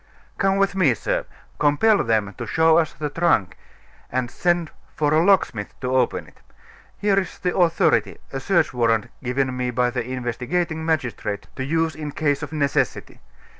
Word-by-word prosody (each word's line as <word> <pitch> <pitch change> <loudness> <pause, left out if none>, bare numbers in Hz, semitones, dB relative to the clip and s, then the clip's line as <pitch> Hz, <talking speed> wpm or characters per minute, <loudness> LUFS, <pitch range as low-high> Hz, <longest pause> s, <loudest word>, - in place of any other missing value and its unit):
"Come 195 0 +2
with 195 0 +2
me, 170 -11 +3
sir; - - -2 0.3
compel 150 +9 +3
them 110 -3 0
to 120 - -4
show 160 +7 +4
us 160 -2 0
the 150 -1 -4
trunk, 165 - +1 0.6
and 125 -1 -1
send 175 -2 0 0.2
for 150 -1 +1
a 160 +1 +4
locksmith 175 - +1
to 130 0 -1
open 125 -2 +1
it. - - -20 0.6
Here 200 -1 +2
is 190 - -5
the 180 - -2
authority 170 -2 +2 0.2
a 135 - -2
search 170 +2 +1
warrant 115 -3 +1
given 130 +1 -1
me 125 0 -1
by 125 0 +1
the 125 -1 -2
investigating 130 +7 -2
magistrate 125 -10 -2
to 130 - -3
use 160 +3 0
in 150 -1 -6
case 145 -2 0
of 150 -1 -6
necessity. 145 -3 -1
145 Hz, 170 wpm, -22 LUFS, 125-165 Hz, 0.6 s, show